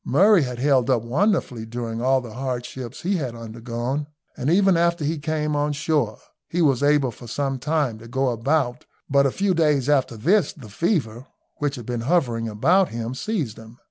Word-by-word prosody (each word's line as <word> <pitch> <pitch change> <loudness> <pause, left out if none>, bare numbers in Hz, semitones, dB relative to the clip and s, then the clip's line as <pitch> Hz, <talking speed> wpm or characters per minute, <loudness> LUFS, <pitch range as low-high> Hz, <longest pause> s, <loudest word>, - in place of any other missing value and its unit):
Murray 195 +6 +5
had 125 -3 -3
held 130 -1 +2
up 120 -4 +2
wonderfully 135 - 0
during 115 0 -5
all 130 +1 +3
the 120 -3 -9
hardships 125 0 -5
he 190 +2 +1
had 130 -7 -4
undergone, 120 +5 -4 0.3
and 130 - -2
even 190 +2 +4
after 170 -2 +1
he 155 +1 -1
came 150 0 -1
on 145 0 0
shore 140 -7 0 0.3
he 175 - -2
was 140 -7 +3
able 145 -3 +3
for 120 +2 -12
some 135 +2 -2
time 140 -5 0
to 115 - -12
go 130 +2 0
about, 125 +1 0 0.2
but 140 0 +4
a - - -1
few 195 +4 +1
days 150 -6 +2
after 135 -5 +2
this 185 - +2
the 135 - -12
fever, 125 - -1 0.3
which 145 -1 -1
had 120 -4 -8
been 120 -1 -3
hovering 120 -5 +1
about 170 - +3
him, 115 +1 -4
seized 145 - -3
him. 115 +1 -13
135 Hz, 190 wpm, -23 LUFS, 120-155 Hz, 0.3 s, Murray